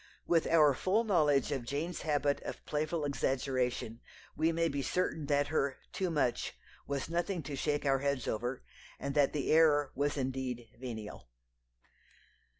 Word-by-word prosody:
With 165 -2 +2
our 155 -4 +5
full 190 - +1
knowledge 150 - +3
of 135 -4 -1
Jane's 150 +7 -3
habit 145 -2 +1
of - - -7
playful 155 +1 -1
exaggeration 130 -4 -1 0.3
we 160 +2 +2
may 165 0 +1
be 140 -3 -2
certain 160 -1 -1
that 145 0 +2
her 140 -3 0 0.2
"too 185 -2 -1
much" 145 -7 0 0.3
was 140 -1 -2
nothing 170 +1 -1
to 140 +1 -5
shake 145 +2 -1
our 135 -1 +3
heads 140 -3 -1
over, 120 +4 -2 0.4
and 140 0 -3
that 145 -2 +3
the 145 -3 -1
"error" 150 -3 +5
was 145 +2 0
indeed 130 -3 -3
"venial." 110 - -7
145 Hz, 150 wpm, -33 LUFS, 130-155 Hz, 0.4 s, our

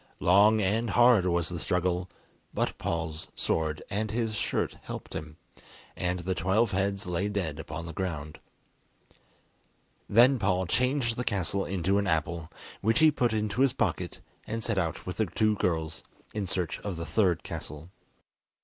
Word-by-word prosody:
Long 105 +4 +5
and 110 +4 +1
hard 120 -6 +5
was 85 -1 +1
the 85 -1 -4
struggle, 90 +1 0 0.5
but - - 0
Paul's 80 -2 -3
sword 80 -1 -1
and 105 +2 -2
his 110 0 -1
shirt 105 - -1
helped - - -7
him, 75 0 -6 0.6
and 90 0 -1
the 95 +2 -1
twelve 95 +5 +2
heads 100 +1 0
lay 90 +3 -1
dead 85 -7 -2
upon 80 +1 -6
the 85 - -7
ground. 75 -5 -4 1.7
Then 125 +4 +6
Paul 95 -2 +1
changed 125 +3 +1
the 125 - -1
castle 100 -3 0
into 95 +2 +1
an 100 - -1
apple, 80 0 -1 0.3
which 110 +3 +2
he 155 -1 +6
put 120 -5 +1
into 110 +2 -1
his 135 -2 +4
pocket, - - -1 0.3
and 115 0 -3
set 110 -5 0
out 85 -4 -2
with 90 - -5
the 110 - +1
two 110 +4 +2
girls 80 -4 -1 0.3
in 105 -3 -2
search 90 -2 -1
of 100 -3 -4
the 85 - -4
third 95 -5 +2
castle. 75 +4 -7
95 Hz, 160 wpm, -29 LUFS, 85-110 Hz, 1.7 s, Then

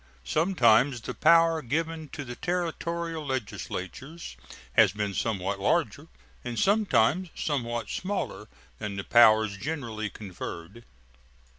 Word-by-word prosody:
Sometimes 130 - +3
the - - -6
power 165 0 +4
given 160 +4 -3
to 145 0 -7
the 120 0 -7
Territorial 170 -1 -3
legislatures 130 - -5 0.4
has 110 -5 +5
been 105 -1 -2
somewhat 100 -1 -2
larger - - 0 0.4
and 120 -1 -5
sometimes 185 - +2
somewhat 120 -6 -2
smaller 195 - -4 0.3
than 105 -1 -4
the 100 - -4
powers 110 -3 +5
generally 115 -6 -4
conferred. 95 +2 -8
125 Hz, 110 wpm, -27 LUFS, 110-165 Hz, 0.4 s, has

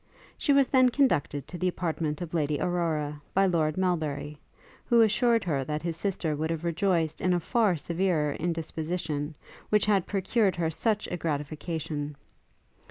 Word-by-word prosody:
She 290 - 0
was 275 -2 +5
then 255 -2 +5
conducted 235 - +1
to 175 - -7
the 185 - +1
apartment 165 -3 -2
of 170 - -8
Lady 150 -3 0
Aurora, 155 -4 -1
by 195 +1 +5
Lord 160 -4 +1
Melbury, 150 -5 -1 0.5
who 235 -1 +5
assured 230 +1 +3
her 145 -6 0
that 150 +3 -3
his 170 -1 -2
sister 170 -3 -1
would 155 +2 -2
have 165 -1 -2
rejoiced 170 -2 0
in 185 - +2
a 175 - +2
far 210 +1 +2
severer 165 -2 0
indisposition, 160 -2 -3 0.3
which 210 -1 +3
had 200 -4 +2
procured 200 +1 +1
her 165 -2 0
such 210 +5 0
a 175 - -2
gratification. 150 -1 -3
170 Hz, 160 wpm, -28 LUFS, 150-190 Hz, 0.5 s, was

